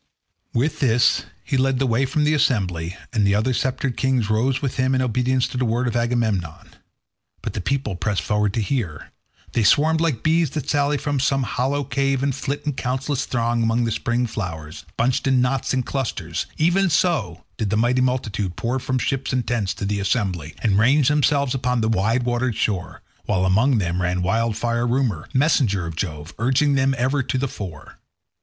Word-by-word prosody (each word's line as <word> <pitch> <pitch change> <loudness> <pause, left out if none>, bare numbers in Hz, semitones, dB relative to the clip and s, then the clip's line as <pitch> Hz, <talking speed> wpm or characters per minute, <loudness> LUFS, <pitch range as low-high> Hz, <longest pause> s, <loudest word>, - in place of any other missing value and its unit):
With 135 +7 0
this 120 -3 +3 0.2
he 140 - -1
led 135 0 +2
the 135 - +1
way 130 +2 +1
from 150 +3 0
the 150 +1 +3
assembly, 95 - 0 0.2
and 110 -3 +2
the 100 0 +3
other 115 +5 +1
sceptred 130 0 -1
kings 130 -5 +1
rose 125 +5 +1
with 135 -3 -3
him 130 +1 +2
in 130 - +2
obedience 125 +1 +1
to - - -5
the 130 - +1
word 120 +2 0
of 120 - -2
Agamemnon; 115 -9 -1 0.7
but - - -4
the - - -3
people 135 -2 -1
pressed 100 +2 -1
forward 105 -1 +1
to 115 - +1
hear. 100 - -3 0.4
They 115 - +2
swarmed 155 +9 +4
like 155 -9 0
bees 160 -1 +3
that 150 0 -5
sally 145 0 +1
from 145 -1 -2
some 135 0 +1
hollow 135 +3 -1
cave 135 0 0
and 140 -1 +1
flit 140 +2 -4
in 150 - 0
countless 130 +2 -2
throng 120 -1 0
among 115 +1 +1
the 115 - -1
spring 120 +3 0
flowers, 80 -9 -6
bunched 125 +3 +1
in 130 -1 +3
knots 125 +1 0
and 130 -2 0
clusters; 135 -4 -3
even 175 +4 +3
so 140 - 0
did 110 -3 -1
the 105 - +1
mighty 120 +3 +2
multitude 110 -8 -1
pour 120 +7 -1
from 130 +1 -1
ships 135 +1 -1
and 125 -3 0
tents 110 -6 0
to - - -4
the 100 0 -1
assembly, 95 -7 -1
and 100 -3 +3
range 135 +5 +4
themselves 140 -2 +2
upon 125 -2 0
the 110 - +1
wide 115 +3 +1
watered 120 -1 0
shore, 95 -5 -2 0.2
while 95 0 +1
among 110 +8 +3
them 90 -2 -1
ran 90 0 0
Wildfire 115 +3 0
Rumour, 120 - -1
messenger 130 - +2
of 80 -1 -6
Jove, 80 -1 -5
urging 130 +5 +2
them 135 0 +2
ever 130 +3 +1
to 130 - -2
the 140 +2 0
fore. 90 - -9
125 Hz, 195 wpm, -22 LUFS, 105-135 Hz, 0.7 s, swarmed